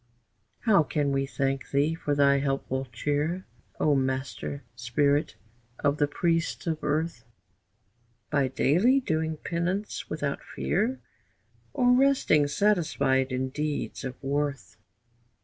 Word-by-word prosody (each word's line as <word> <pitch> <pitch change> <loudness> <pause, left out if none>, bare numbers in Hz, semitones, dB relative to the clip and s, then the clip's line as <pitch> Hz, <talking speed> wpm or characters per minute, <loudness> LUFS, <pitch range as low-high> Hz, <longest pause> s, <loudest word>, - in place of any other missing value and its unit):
How 205 -7 +5
can 145 -2 0
we 135 0 0
thank 135 -1 -2
thee 145 +3 +2
for 150 -3 -2
thy 140 -1 +4
helpful 135 -1 -1
cheer, 150 +9 -1 0.3
O 150 - +3
master 135 +1 -2
spirit 140 +5 +1 0.4
of 145 +1 +1
the 145 - +2
priests 165 +2 -1
of 160 -2 -2
earth? 155 -4 -1 1.1
By 140 -3 +2
daily 180 - +3
doing 160 -8 -1
penance 175 +6 -3
without 145 -2 -2
fear, 225 +8 -1 0.7
Or 245 0 +3
resting 255 - +4
satisfied 140 -8 +1
in 130 +1 -1
deeds 150 +2 -3
of 130 -1 -4
worth? 140 -4 -2
145 Hz, 115 wpm, -27 LUFS, 135-165 Hz, 1.1 s, How